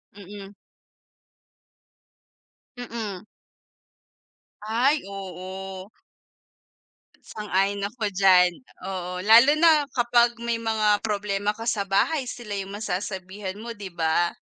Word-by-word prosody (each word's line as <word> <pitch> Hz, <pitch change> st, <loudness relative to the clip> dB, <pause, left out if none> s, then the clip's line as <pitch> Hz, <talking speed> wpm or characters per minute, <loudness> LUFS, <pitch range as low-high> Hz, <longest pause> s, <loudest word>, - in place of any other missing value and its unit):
Mm. 200 Hz, 0 st, -11 dB, 2.2 s
Mm. 220 Hz, -5 st, -6 dB, 1.4 s
Ay, 245 Hz, +8 st, +1 dB
oo. 190 Hz, 0 st, -8 dB, 1.3 s
Sang-ayon 200 Hz, -1 st, -1 dB
ako 215 Hz, 0 st, -3 dB
diyan, 185 Hz, -2 st, +5 dB, 0.4 s
oo. 180 Hz, -1 st, -4 dB
Lalo 230 Hz, +7 st, +7 dB
na 315 Hz, -3 st, +5 dB
kapag 240 Hz, -1 st, +3 dB
may 235 Hz, -1 st, -1 dB
mga 215 Hz, -2 st, +2 dB
problema 205 Hz, -1 st, -1 dB
ka 225 Hz, +1 st, -8 dB
sa 200 Hz, -3 st, -1 dB
bahay, 255 Hz, +9 st, +1 dB
sila 215 Hz, -5 st, -6 dB
yung 195 Hz, 0 st, -6 dB
masasabihan 190 Hz, -1 st, -4 dB
mo, 235 Hz, +1 st, -8 dB
'di 195 Hz, -3 st, -9 dB
ba? 170 Hz, +1 st, +1 dB
205 Hz, 95 wpm, -25 LUFS, 190-225 Hz, 2.2 s, Lalo